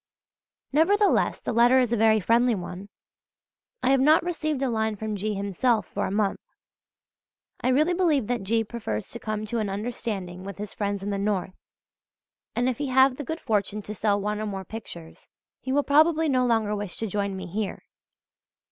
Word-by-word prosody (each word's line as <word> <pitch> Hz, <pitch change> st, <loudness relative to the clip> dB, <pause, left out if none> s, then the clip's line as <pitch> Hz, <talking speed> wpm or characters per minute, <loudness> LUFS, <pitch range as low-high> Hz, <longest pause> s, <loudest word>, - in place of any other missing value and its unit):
Nevertheless 400 Hz, +7 st, +3 dB
the -, -, -3 dB
letter 240 Hz, +3 st, +5 dB
is 245 Hz, -2 st, +1 dB
a -, -, +4 dB
very 220 Hz, -1 st, +4 dB
friendly 235 Hz, +4 st, +3 dB
one. 185 Hz, +1 st, -7 dB, 0.9 s
I -, -, +3 dB
have 270 Hz, -, +4 dB
not 305 Hz, +5 st, +5 dB
received 310 Hz, -5 st, -2 dB
a 265 Hz, -, +1 dB
line 220 Hz, -1 st, 0 dB
from 215 Hz, +1 st, -4 dB
G. 210 Hz, +1 st, -2 dB
himself 200 Hz, +4 st, 0 dB
for -, -, -3 dB
a -, -, -4 dB
month. 205 Hz, 0 st, 0 dB, 1.2 s
I -, -, +1 dB
really 300 Hz, +7 st, +3 dB
believe 325 Hz, -, +2 dB
that 240 Hz, 0 st, -1 dB
G. 225 Hz, +4 st, +1 dB
prefers 210 Hz, -, -4 dB
to 235 Hz, -, -6 dB
come 215 Hz, -1 st, -3 dB
to 230 Hz, +2 st, -2 dB
an 210 Hz, -2 st, -1 dB
understanding 195 Hz, -4 st, -4 dB
with 200 Hz, +1 st, -7 dB
his 205 Hz, 0 st, -6 dB
friends 200 Hz, -1 st, -2 dB
in 205 Hz, -, -2 dB
the 200 Hz, -, -2 dB
North, 195 Hz, -2 st, -1 dB, 1.0 s
and 245 Hz, +1 st, +1 dB
if 255 Hz, -1 st, -1 dB
he 290 Hz, -, -1 dB
have 260 Hz, 0 st, +4 dB
the 290 Hz, -, -4 dB
good 320 Hz, +5 st, -4 dB
fortune 210 Hz, -4 st, -1 dB
to 210 Hz, -, -6 dB
sell 205 Hz, 0 st, +1 dB
one 210 Hz, +1 st, -2 dB
or 215 Hz, -, -3 dB
more 195 Hz, -2 st, -5 dB
pictures, 170 Hz, -6 st, -10 dB, 0.3 s
he 260 Hz, -, -5 dB
will 290 Hz, +2 st, +2 dB
probably 315 Hz, +3 st, +4 dB
no 255 Hz, -3 st, +2 dB
longer 220 Hz, -3 st, +1 dB
wish 205 Hz, -3 st, -5 dB
to 225 Hz, -, -2 dB
join 200 Hz, -1 st, -2 dB
me 185 Hz, -, -6 dB
here. 200 Hz, +3 st, -4 dB
220 Hz, 190 wpm, -26 LUFS, 200-255 Hz, 1.2 s, letter